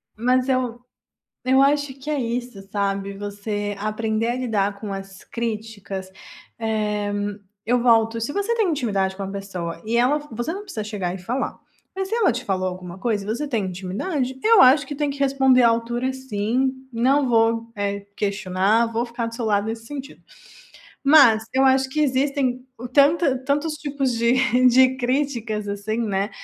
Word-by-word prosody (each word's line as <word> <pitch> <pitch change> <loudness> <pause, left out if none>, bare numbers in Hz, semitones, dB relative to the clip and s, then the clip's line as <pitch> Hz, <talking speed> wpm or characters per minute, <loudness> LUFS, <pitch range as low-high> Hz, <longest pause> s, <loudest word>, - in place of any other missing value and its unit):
Mas 250 +3 +1
eu 250 -2 0 0.6
eu 260 +1 +4
acho 285 0 +2
que 270 +3 -9
é 300 -2 0
isso 240 -2 -3
sabe, 200 -1 -1
você 205 0 -4
aprender 220 +2 -1
a 240 - 0
lidar 205 -5 -1
com 210 -1 -6
as 195 0 -8
críticas, 215 -5 -5 0.5
eh, 210 -2 -1 0.5
eu 245 +2 +1
volto 230 -1 +4
se 230 +6 -3
você 405 +4 0
tem 440 -4 +2
intimidade 200 - 0
com 200 - -8
a - - -4
pessoa 195 -4 -5
e 225 +2 -1
ela 255 +5 +3
você 240 +7 -3
não 400 +2 -6
precisa 350 - -5
chegar 200 -4 -3
e 190 - -6
falar, 240 +9 -3 0.4
mas 385 0 -3
se 450 - 0
ela 460 -5 +3
te - - -4
falou 185 -1 -1
alguma 180 -1 -7
coisa 210 -1 -1
e - - -10
você 240 +8 -2
tem 230 -8 -1
intimidade 250 - -3
eu 450 -1 +6
acho 270 +3 +6
que 290 - -5
tem 295 0 -1
que 280 - -9
responder 265 -2 +4
à 235 - +7
altura 240 +3 -1
sim, 260 +1 -1 0.2
não 260 +4 +2
vou, 230 0 +2
eh, 200 0 -3
questionar, 200 +2 +1
vou 230 +1 -1
ficar 235 -1 -4
do 230 - -7
seu 235 -2 -3
lado 205 0 +1
nesse 225 0 -5
sentido. 275 +1 -8 0.8
Mas 275 -7 +7
eu 265 - +4
acho 265 0 +4
que 305 - -1
existem 265 -2 0 0.3
tanta 285 -1 +4
tantos 295 +3 0
tipos 280 -3 -2
de 235 +1 +2 0.3
de 260 +1 +5
críticas 240 -5 -1
assim, 205 +2 -3
né, 200 -3 0
235 Hz, 175 wpm, -23 LUFS, 205-265 Hz, 0.8 s, à